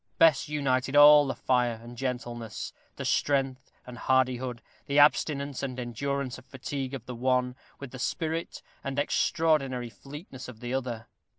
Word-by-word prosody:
Bess 155 -2 +5
united 135 -2 0
all 145 0 +9
the 135 - -2
fire 125 -3 +1
and 120 +1 -11
gentleness, 120 -3 -4 0.2
the - - -5
strength 135 -2 0
and 125 -1 -10
hardihood, 130 -2 +1 0.2
the 140 0 0
abstinence 145 -1 +3
and 130 -2 -4
endurance 130 +2 -3
of 130 - -18
fatigue 135 0 -5
of 125 -3 -8
the 125 - -6
one, 125 +1 0 0.2
with 140 -3 -8
the 130 - -9
spirit 160 +5 -3 0.2
and 135 -1 -4
extraordinary 140 -5 +1
fleetness 135 - -10
of 120 -4 -10
the 120 +1 -5
other. 120 -4 -3
130 Hz, 155 wpm, -28 LUFS, 125-140 Hz, 0.2 s, all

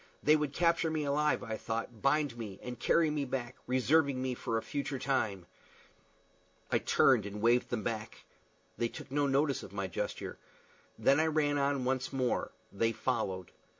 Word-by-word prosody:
They 150 - +6
would 150 -2 0
capture 170 +1 +2
me 155 -1 -1
alive, 150 +1 +1
I 110 -1 -4
thought, 115 0 -4
bind 145 -2 +2
me, 105 -5 -7
and 125 -1 -6
carry 160 +3 +3
me 150 -1 -1
back, 130 -2 -4
reserving 135 +2 +3
me 130 0 -1
for 115 -2 -2
a 110 - -2
future 140 -1 -3
time! 110 -9 -1 1.3
I - - +3
turned 115 -6 +4
and 105 +1 -6
waved 120 +3 +3
them 115 -4 -2
back. 110 -1 -4 0.5
They 120 - +2
took - - -10
no 145 0 +2
notice 140 0 +2
of - - -11
my 100 -1 -2
gesture. 95 - -4 0.6
Then 140 +2 +4
I 160 - +3
ran 150 -2 +1
on 140 -2 +1
once 130 0 0
more. 130 -3 0 0.2
They 115 +3 +1
followed. 105 -7 -2
130 Hz, 175 wpm, -32 LUFS, 115-145 Hz, 1.3 s, They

